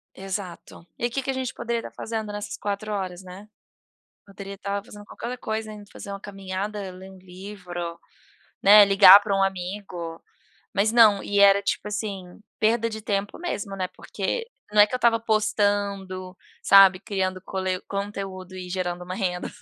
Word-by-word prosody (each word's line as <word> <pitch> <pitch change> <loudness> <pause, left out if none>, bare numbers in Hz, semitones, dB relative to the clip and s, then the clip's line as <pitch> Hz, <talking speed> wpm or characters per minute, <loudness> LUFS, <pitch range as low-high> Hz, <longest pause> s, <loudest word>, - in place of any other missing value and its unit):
Exato, 190 -3 -7
e 240 0 -1
que 270 +3 -2
que 270 - -2
a - - 0
gente 260 -2 -4
poderia 235 -1 -2
tá - - -8
fazendo 220 -2 -5
nessas 205 0 -5
4 205 +1 -4
horas, 185 -2 -4
né, 185 +3 -11 0.8
poderia 200 0 -9
tá 200 0 -3
fazendo 205 -1 -12
qualquer - - -9
outra 250 +1 -4
coisa, 220 -1 -4
indo 205 -1 -11
fazer 200 - -9
uma 200 - -6
caminhada, 195 0 -5
ler 185 +1 -11
um 190 - -14
livro, 180 -2 -8 0.6
né, 205 +1 +9
ligar 195 0 +9
pra 200 -1 -1
um 195 - +3
amigo, 180 -3 -4 0.5
mas 215 +3 +2
não, 220 -4 +6
e 205 0 0
era 200 0 +6
tipo 200 - -2
assim, 200 -4 -5 0.2
perda 230 +1 +2
de 220 -1 -7
tempo 200 -1 -2
mesmo, 205 - -4
né, 185 -1 -2
porque 460 - -4 0.3
não 210 - +5
é 205 - +9
que 235 - -6
eu - - 0
tava 230 -1 +3
postando, 200 -4 -1 0.3
sabe, 195 -2 +7
criando 190 -3 -2
cole 185 -1 -2
conteúdo 195 -2 -5
e 180 -1 -7
gerando 180 -1 -3
uma 180 +1 -5
renda. 180 -3 -2
200 Hz, 175 wpm, -25 LUFS, 185-210 Hz, 0.8 s, né